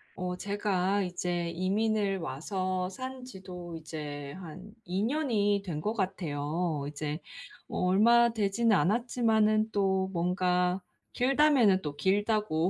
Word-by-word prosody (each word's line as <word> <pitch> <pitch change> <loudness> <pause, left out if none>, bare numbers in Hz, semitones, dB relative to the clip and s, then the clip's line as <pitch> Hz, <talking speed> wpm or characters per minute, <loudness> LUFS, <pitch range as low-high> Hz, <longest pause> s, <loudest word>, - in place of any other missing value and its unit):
어 180 0 -3
제가 200 0 0
이제 175 -1 -2
이민을 200 +2 0
와서 185 +5 -2
산 255 +4 -7
지도 180 -7 -8
이제 145 -3 -6
한 185 +4 -10
2 185 +3 -2
년이 220 -7 +1
된 165 -5 -3
것 210 +8 -1
같아요. 165 -5 -2
이제 150 +1 -4 0.5
얼마 230 +6 +4
되지는 220 +1 +2
않았지만은 220 0 +2
또 190 -2 +1
뭔가 180 +1 +1 0.3
길다면은 255 -7 +4
또 150 -3 -5
길다고 200 -2 +1
190 Hz, 215 characters per minute, -30 LUFS, 175-215 Hz, 0.5 s, 얼마